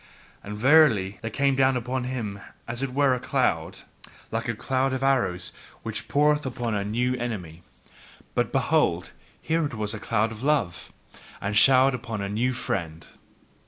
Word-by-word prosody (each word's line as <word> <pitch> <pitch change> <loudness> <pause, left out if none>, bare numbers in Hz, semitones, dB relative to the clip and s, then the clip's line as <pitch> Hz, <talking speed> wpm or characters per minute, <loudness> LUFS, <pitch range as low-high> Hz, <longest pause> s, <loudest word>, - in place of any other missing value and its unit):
And 105 +1 -6
verily, 120 -7 +4
there 115 - -3
came 140 +4 +1
down 130 -1 +3
upon 125 +1 -3
him 115 -6 -4 0.3
as 120 +2 -4
it 135 -2 -2
were 140 0 +3
a 125 - -1
cloud, - - -1 0.5
like - - -2
a - - -1
cloud 130 0 0
of 130 0 -2
arrows 130 -10 +1 0.3
which - - -5
poureth 150 +1 +3
upon 120 -3 -3
a 100 -1 0
new 120 +5 0
enemy. 90 -10 -5 0.7
But - - 0
behold, - - +1 0.3
here 165 +1 0
it 145 -5 -3
was 105 -1 -1
a 110 - -5
cloud 115 0 0
of 110 - -9
love, 135 - 0 0.5
and 100 +1 -3
showered 130 +4 +6
upon 115 -3 -4
a 100 0 -3
new 115 +5 0
friend. 85 -9 -4
120 Hz, 165 wpm, -26 LUFS, 105-135 Hz, 0.7 s, showered